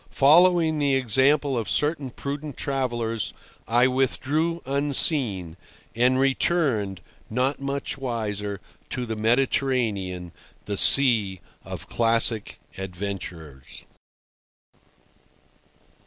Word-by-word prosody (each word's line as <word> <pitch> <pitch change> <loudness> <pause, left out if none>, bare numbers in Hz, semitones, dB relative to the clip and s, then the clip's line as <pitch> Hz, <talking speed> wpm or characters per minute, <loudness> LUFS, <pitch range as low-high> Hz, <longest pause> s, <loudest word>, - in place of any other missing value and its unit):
Following 160 +2 +4
the 140 -2 +1
example 135 +3 +2
of 115 -3 -3
certain 150 -2 0
prudent 140 +3 -7
travellers, 120 -5 -2 0.3
I 120 +3 +3
withdrew 140 +6 -1
unseen—and 130 - 0
returned, 135 - 0 0.3
not 130 +5 -1
much 140 0 -4
wiser, 105 -5 -4 0.3
to 125 -1 -4
the 110 -1 -5
Mediterranean, 110 -6 -1 0.3
the 105 - -4
sea 110 -9 +6 0.2
of - - -8
classic 115 -2 +2 0.2
adventures. 90 -7 -7
125 Hz, 80 wpm, -24 LUFS, 105-140 Hz, 0.3 s, sea